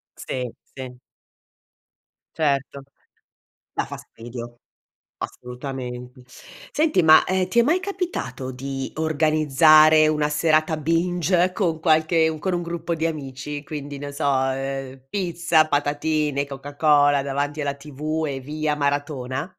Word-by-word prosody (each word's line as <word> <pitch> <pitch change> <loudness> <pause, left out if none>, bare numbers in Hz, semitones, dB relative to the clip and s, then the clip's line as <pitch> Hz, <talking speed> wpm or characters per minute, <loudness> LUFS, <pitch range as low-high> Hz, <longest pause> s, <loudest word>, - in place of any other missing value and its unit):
Sì, 125 -2 -4 0.3
sì. 130 -2 -8 1.4
Certo! 140 -2 -1 0.9
Dà - - -2
fastidio, 120 +1 -9 0.6
assolutamente. 125 0 -7 0.5
Senti, 305 - +2
ma, 155 0 +8
ehm, 185 -1 0
ti 235 +6 +2
è - - +8
mai 320 +9 +2
capitato 355 - -4
di 135 +1 -5
organizzare 155 0 +5
una 150 -1 +1
serata 155 +1 +2
binge 175 +3 +1
con 170 -6 0
qualche 160 0 +3
con 190 +2 -1
un 175 0 -1
gruppo 170 0 -3
di 160 0 -2
amici? 145 -1 -5
Quindi, 145 -1 -6
non 145 0 -6
so, 145 +2 -3
uhm, 135 0 -1
pizza, 170 -4 +2
patatine, 145 0 0
coca 140 +1 -9
cola 145 -2 +4
davanti 145 +2 -2
alla 140 -1 -2
TV, 150 +2 -4
e 135 -1 -3
via 150 +2 -2
maratona? 145 0 -2
150 Hz, 120 wpm, -23 LUFS, 135-160 Hz, 1.4 s, ma